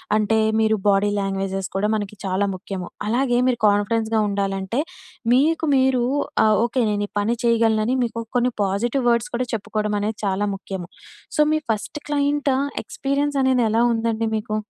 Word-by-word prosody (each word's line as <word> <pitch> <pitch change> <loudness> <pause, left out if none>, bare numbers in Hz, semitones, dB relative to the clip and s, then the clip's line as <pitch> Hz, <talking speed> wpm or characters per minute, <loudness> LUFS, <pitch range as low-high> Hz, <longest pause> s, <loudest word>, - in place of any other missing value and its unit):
అంటే 215 +1 +2 0.2
మీరు 220 0 +3
body 200 +1 +3
languages 195 -1 -2
కూడా 200 +2 +1
మనకి 205 0 -4
చాలా 190 +1 +1
ముఖ్యము. 185 -1 -6 0.2
అలాగే 245 +1 +1
మీరు 245 -2 +1
కాన్ఫిడెన్స్‌గా 220 +2 +1
ఉండాలంటే 195 +2 -2 0.5
మీకు 320 +5 +3
మీరు 260 -2 +2 0.4
ఆహ్, 215 - +4
ఓకె. 240 +1 0
నేను 205 0 -1
ఈ - - -57
పని 220 +3 +1
చేయగలనని 230 0 +2
మీకు 230 -1 -3 0.2
కొన్ని 245 +1 +3
పాజిటివ్ 230 +7 0
వర్డ్స్ 235 -1 +1
కూడా 250 +1 -1
చెప్పుకోవడం 215 0 -2
అనేది 210 +1 -2
చాలా 195 +1 0
ముఖ్యము. 190 -2 -7 0.5
సో 300 - +3
మీ 310 - +3
ఫస్ట్ 215 +7 -4
క్లైంట్ 285 -1 +1 0.3
ఎక్స్పీరియన్స్ 280 +1 -1
అనేది 260 -2 +3
ఎలా 225 +2 +2
ఉందండి 225 0 -1
మీకు? 215 0 -3
220 Hz, 155 wpm, -22 LUFS, 200-245 Hz, 0.5 s, ఆహ్